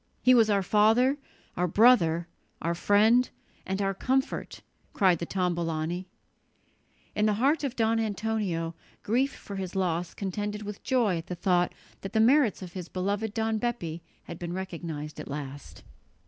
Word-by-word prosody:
"He 255 - +7
was 225 -3 +5
our 200 -2 +2
father, 225 +8 +3 0.4
our 180 +1 +1
brother, 170 -5 +4 0.3
our 170 - -1
friend, 215 +7 +4 0.4
and 190 +1 -1
our 195 0 0
comfort," 265 - -2 0.3
cried 185 -4 +3
the 170 - -4
Tombolani. 175 -1 -1 1.1
In 210 +1 +2
the 210 - +2
heart 280 +8 +2
of 270 -3 -2
Don 225 0 +2
Antonio 210 -6 -1 0.3
grief 255 +6 +1
for 200 -6 -9
his 190 -1 -5
loss 180 -2 -1
contended 205 +2 -3
with 210 -1 -7
joy 225 -9 +1
at 165 - -10
the 180 - -4
thought 175 0 +1 0.3
that 195 - -7
the 220 - +2
merits 240 -3 +4
of 175 -2 -9
his 180 -3 -6
beloved 205 +3 -2
Don 220 -1 0
Bepi 175 -9 -3 0.2
had 170 - -9
been 175 0 -4
recognized 165 -5 -5
at - - -7
last. 140 -1 -7
195 Hz, 160 wpm, -28 LUFS, 175-225 Hz, 1.1 s, He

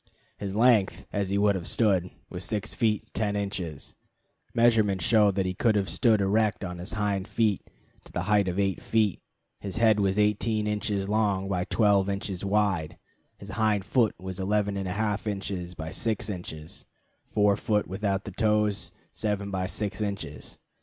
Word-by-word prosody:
His 100 -1 -4
length, 115 -3 +3
as 100 -2 -1
he 100 - +1
would 100 0 +4
have 90 -3 -4
stood, 95 -6 +2 0.2
was 90 0 -6
6 105 +3 -2
feet 110 -2 0
10 105 -2 0
inches. 100 -7 -4 0.6
Measurements 110 -6 +3
show 110 -2 +5
that 95 -1 0
he 90 - -1
could 110 +3 +2
have 100 -2 0
stood 110 -4 +3
erect 105 +1 +1
on 90 -1 -5
his 90 +6 -3
hind 100 -3 -1
feet 110 -4 0 0.4
to - - -14
the 90 - -2
height 105 -1 +3
of 90 0 -2
8 95 -1 0
feet. 110 -4 +1 0.4
His 100 -3 -5
head 110 -2 +4
was 100 -1 +1
18 105 +1 +2
inches 105 -2 -1
long 100 -2 +1
by 90 -2 -1
12 100 -3 +3
inches 100 -2 -3
wide; 95 -5 0 0.4
his 100 - -11
hind 105 -3 +1
foot 115 -3 +2
11 95 +3 -1
1/2 100 +2 -2
inches 95 -3 -4
by 80 0 -6
6 110 +1 -1
inches; 80 -4 -7 0.4
fore 105 -1 +3
foot, 105 0 0
without 100 +1 -2
the 105 - -5
toes, 105 0 +1 0.2
7 100 -1 -2
by 95 -1 -1
6 105 +2 -3
inches. 100 -10 -5
100 Hz, 165 wpm, -27 LUFS, 95-105 Hz, 0.6 s, show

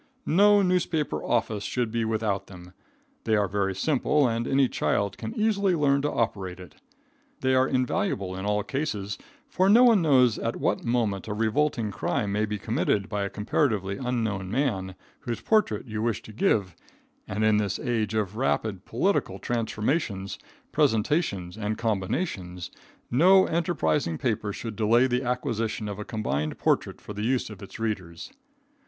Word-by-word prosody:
No 205 +4 +5
newspaper 180 -4 0
office 110 -3 0
should 120 -3 -2
be 115 0 0
without 110 -3 -1
them. 90 -1 -12 0.5
They 110 - +3
are 105 -1 +2
very 95 0 -1
simple, 145 +4 +2
and 115 0 -1
any 135 -1 +3
child 100 -4 0
can 225 - -6
easily 200 -4 +2
learn 140 -3 +2
to 145 - 0
operate 95 -5 -2
it. 90 - -11 0.7
They 130 0 +2
are 130 0 +4
invaluable 130 - -1
in 95 - -5
all 105 0 0
cases, 105 -7 -3 0.3
for 185 +1 +2
no 235 +5 +7
one 230 -6 +6
knows 130 -7 +4
at 115 - -2
what - - -1
moment 115 -5 0
a 105 - -3
revolting 115 0 0
crime 105 -1 -1
may 105 +2 +1
be 105 0 -3
committed 100 +1 0
by 105 -2 -2
a - - -3
comparatively 105 -3 0
unknown 110 -7 -2
man, 100 -7 -1 0.2
whose 120 -2 -4
portrait 210 - +1
you 110 -3 -4
wish 115 -1 -1
to 110 - -11
give, 100 -5 +1 0.5
and 105 +3 -2
in 110 -1 +4
this 100 -2 0
age 115 -5 -1
of 105 -1 -1
rapid 110 -6 -1
political 190 - 0
transformations, 110 - -2 0.3
presentations 105 - +1
and 105 0 -2
combinations, 95 - -2 0.4
no 185 +9 +6
enterprising 85 - 0
paper 105 -2 -1
should 110 +1 -6
delay 115 +3 +4
the 125 -1 0
acquisition 115 -4 -2
of 100 0 -5
a - - -3
combined 75 - -2
portrait - - 0
for 105 - -9
the 105 - -5
use 120 0 0
of 105 - -11
its 100 - -9
readers. 95 -7 -4
110 Hz, 160 wpm, -26 LUFS, 100-135 Hz, 0.7 s, no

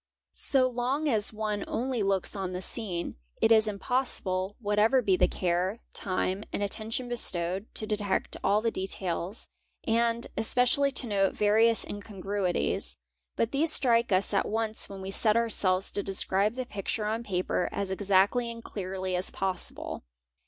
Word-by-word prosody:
So 260 -2 +2
long 255 +5 -1
as 220 -6 +1
one 215 -2 -2
only 250 0 -1
looks 195 -1 0
o: 195 -2 -2
the 180 +1 -4
scene, 185 - -1 0.2
it 225 - +3
is 220 -1 +6
impossible, 200 -3 -1
whatever 210 +3 +3
be 195 -3 +3
the - - +3
care, 180 +3 -1 0.2
time, 190 +1 -2
and 205 - -2
attention 220 +4 -2
bestowed, 190 -4 +2
to 215 - +1
detect 210 -2 -1
all 205 +2 +3
the 230 - +1
details, 190 0 -4 0.4
and 230 +1 +1
especially 250 +5 +3
to 260 - +2
note 195 -3 +1
various 220 +2 +3
incon 205 -1 -8
gruities: 185 - -1 0.4
but 230 - 0
these 300 +4 +2
strike 235 -4 +2
us 190 +2 +2
at 195 - +2
once 220 0 -1
when 195 -1 -8
we 190 - -5
set 215 +2 +4
ourselves 195 -5 +1
to 205 - -1
describe 195 +2 0
the 255 -1 -3
picture 210 0 -3
on 220 +2 -1
paper 180 -3 -1
as 200 -1 -3
exactly 200 +5 +2
and 230 0 -8
cléarly 185 -1 -4
as 180 +1 -1
possible. 190 -2 -4
205 Hz, 160 wpm, -28 LUFS, 190-230 Hz, 0.4 s, is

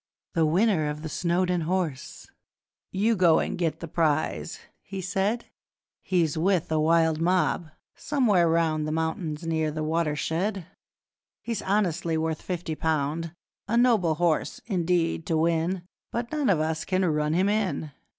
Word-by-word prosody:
The 165 -3 +3
winner 175 -2 +2
of 150 +1 -5
the 160 - -4
Snowdon 175 +2 0
Horse!' 170 -6 -3 0.7
'You 215 +4 +2
go 175 -4 +5
and - - -1
get 170 -3 -1
your 165 - -5
prize,' 145 - 0 0.2
he 195 -1 -7
said, 195 +5 -1 0.6
'He's 170 -5 +1
with 180 -2 +1
a 155 - +2
wild 160 0 +3
mob, 175 -1 +1 0.2
somewhere 215 - +2
round 160 -2 +1
The - - -2
mountains 160 0 -2
near 160 -1 0
The 155 +1 -3
Watershed; 165 +4 -1 0.8
He's 230 -3 -3
honestly 175 -5 0
worth 160 0 -2
fifty 175 -3 -4
pound, 160 +1 -1 0.3
A 230 +3 +1
noble 220 -10 +3
horse, 165 -1 0
indeed, 175 -5 0
to 165 - +1
win, 170 +3 +1 0.3
But 235 0 -3
none 295 -6 0
of 180 -6 +3
US 160 0 -1
can 185 0 0
run 150 -2 +1
him 185 +4 +2
in! 200 -7 -1
165 Hz, 150 wpm, -26 LUFS, 160-190 Hz, 0.8 s, go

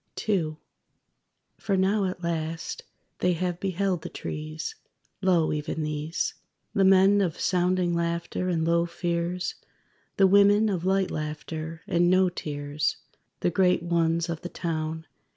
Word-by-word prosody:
_) - - -6
II 165 -7 +1 1.0
For 195 -3 0
now 195 +2 +2
at 185 -1 -4
last, 165 -1 -3 0.4
they 180 0 +2
have 175 0 -2
beheld 190 -2 -1
the - - -6
trees. 155 - -5 0.5
Lo, 175 -5 +3
even 155 +1 -3
these! 150 +2 -2 0.4
The 200 - +3
men 195 +1 +6
of 175 -5 -1
sounding 180 -1 +1
laughter 170 +2 -1
and 165 -2 +1
low 170 +1 +2
fears; 170 +1 -2 0.6
The 195 - +6
women 205 +2 +5
of 180 -3 -2
light 190 0 +2
laughter, 155 +1 -5
and 175 0 +2
no 185 0 +4
tears; 145 -3 -2 0.4
The 175 - +2
great 180 -1 +3
ones 170 -1 +1
of 165 -2 -4
the 175 - -5
town. 160 -2 -3
170 Hz, 140 wpm, -27 LUFS, 160-185 Hz, 1.0 s, men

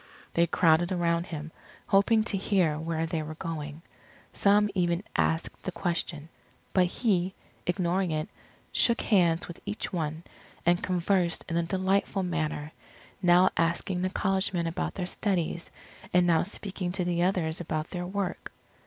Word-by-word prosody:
They 170 0 +3
crowded 170 +1 +3
around 170 -1 +1
him, 155 -1 -6 0.3
hoping 215 +3 +4
to 215 - -1
hear 185 -6 +1
where 160 0 -1
they 165 -1 -2
were 155 +1 -6
going. 155 -1 -5 0.5
Some 205 +1 +4
even 175 -1 +1
asked 160 +1 0
the 185 - -4
question. 170 -4 -2 0.5
But 185 -2 +4
he, 190 -2 0 0.3
ignoring 180 +1 +1
it, 155 0 -1 0.4
shook 235 -1 +3
hands 175 -6 +3
with 170 - -10
each 205 0 -3
one, 160 -1 -2 0.4
and 175 +1 +3
conversed 180 -1 +1
in 165 - -3
a 170 - +3
delightful 190 +2 0
manner, 155 -4 -2 0.5
now 180 +1 +5
asking 170 +2 0
the 185 - +1
college 190 0 0
men 170 -2 0
about 165 0 -2
their 185 - -2
studies, 175 -3 -1 0.4
and 180 0 +4
now 165 -2 +4
speaking 190 -2 -4
to 185 -2 -1
the 175 -1 0
others 175 -3 +1
about 155 -1 -3
their 180 -1 -3
work. 195 -1 -3
175 Hz, 155 wpm, -28 LUFS, 165-190 Hz, 0.5 s, now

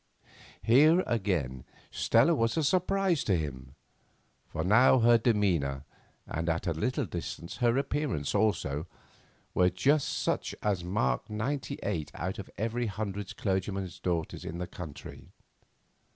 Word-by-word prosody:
Here, 155 +9 +6
again, 85 - -1 0.3
Stella - - +3
was 115 +5 +1
a 160 - +2
surprise 185 +1 +2
to 95 -4 +2
him, 65 -4 -6 0.7
for 80 - -3
now 110 +8 +6
her 120 -1 +5
demeanour, 90 - +1 0.4
and 85 +2 -3
at 85 +2 -1
a 85 - +1
little 125 - -1
distance 85 -1 -6
her 120 0 +2
appearance 140 - -1
also, 100 -8 0 0.7
were 90 0 +4
just 135 +12 +2
such - - -1
as 100 -4 0
mark 100 +6 -1
ninety 135 +6 -3
eight 80 -3 -2
out 95 +3 -4
of 100 - -7
every 115 +2 -1
hundred 100 -1 -5
clergyman's 95 -1 -2
daughters 85 -3 -2
in 85 - -5
the 90 - -3
country. 80 -5 -9
100 Hz, 135 wpm, -29 LUFS, 85-120 Hz, 0.7 s, Here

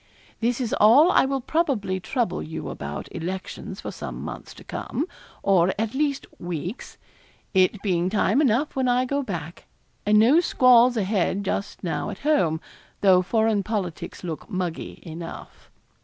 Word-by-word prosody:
'This 240 +2 0
is 245 -4 -2
all 270 - +7
I - - +5
will 270 0 -1
probably 240 - 0
trouble 185 -1 -1
you 160 - -6
about 70 +1 -6
elections 185 +3 -5
for - - -5
some - - -7
months - - -7
to - - -13
come, 305 - -3 0.4
or, 190 -2 +3
at 220 +1 -1
least, 280 0 0
weeks. 175 - -5 0.6
It 190 +1 +3
being 180 -3 +1
time 210 +5 +2
enough 275 +2 +1
when 260 -1 +1
I 250 +1 +2
go 280 +2 -1
back, 170 - -6 0.4
and 210 +1 +4
no 245 +9 +6
squalls 250 -6 +5
a 215 - +2
head 200 0 0
just 200 +2 -3
now 175 - -2
at - - -6
home, 175 - +2 0.4
though 185 -2 +6
foreign 220 +2 +1
politics 195 -6 -4
look 165 +2 -6
muggy 185 -5 -4
enough. 165 0 -9
210 Hz, 155 wpm, -24 LUFS, 180-250 Hz, 0.6 s, all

